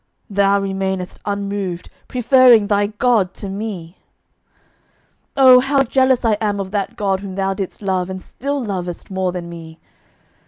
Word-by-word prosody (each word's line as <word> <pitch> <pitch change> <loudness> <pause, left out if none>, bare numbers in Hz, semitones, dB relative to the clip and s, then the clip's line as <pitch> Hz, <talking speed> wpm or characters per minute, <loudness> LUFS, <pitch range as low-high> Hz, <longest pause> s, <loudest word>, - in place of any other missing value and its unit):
Thou 200 0 +3
remainedst 190 -1 -3
unmoved, 200 -3 -4 0.2
preferring 250 -3 +5
thy 205 0 +1
God 210 -3 +1
to 200 - -6
me! 195 -4 -6 1.4
'Ah, 260 -2 +8
how 270 +1 +2
jealous 260 -1 +2
I 215 -2 +2
am 205 -2 -1
of 190 -1 -5
that 200 -2 -2
God 195 -2 0
whom 195 -1 -7
thou 195 0 0
didst 195 +1 -6
love 190 -2 -1
and 190 0 -5
still 280 +8 -4
lovest 180 -4 -5
more 190 -1 -1
than 175 -1 -6
me! 165 -1 -10
200 Hz, 150 wpm, -19 LUFS, 190-220 Hz, 1.4 s, Ah